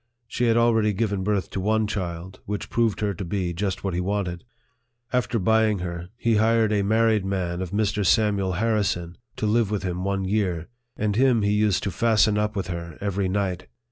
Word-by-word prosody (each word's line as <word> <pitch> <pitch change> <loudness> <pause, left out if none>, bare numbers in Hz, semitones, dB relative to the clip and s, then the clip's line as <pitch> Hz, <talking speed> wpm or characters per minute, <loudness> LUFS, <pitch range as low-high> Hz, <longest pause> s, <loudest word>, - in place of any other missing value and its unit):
She 120 +2 -1
had 115 -1 +3
already 115 -2 +3
given 100 -2 -1
birth 100 -1 -1
to - - -3
one 110 +3 +1
child, 90 -3 -5
which 105 0 -4
proved 115 -3 +1
her 105 -1 0
to 95 - -6
be 90 -1 -2
just 100 +2 -3
what 95 -2 -2
he 90 - -1
wanted. 90 -2 -2 0.7
After 125 -1 +1
buying 110 +1 +3
her, 85 -1 -5
he 115 -3 +2
hired 110 0 +3
a 105 - +2
married 110 0 +2
man 95 -2 -2
of 95 - -3
Mr. 105 +1 0
Samuel 100 -2 +2
Harrison, 95 -4 0 0.2
to - - -3
live 110 0 +2
with 105 -3 -2
him 90 -1 -3
one 100 0 -1
year; 95 -5 -1 0.3
and 105 -1 0
him 125 -2 +3
he 100 - +2
used 105 -6 +2
to 100 - -1
fasten 110 +1 +3
up 105 0 -1
with 95 -3 -2
her 85 -2 -6
every 100 -1 -1
night 95 -2 -2
100 Hz, 200 wpm, -24 LUFS, 90-110 Hz, 0.7 s, had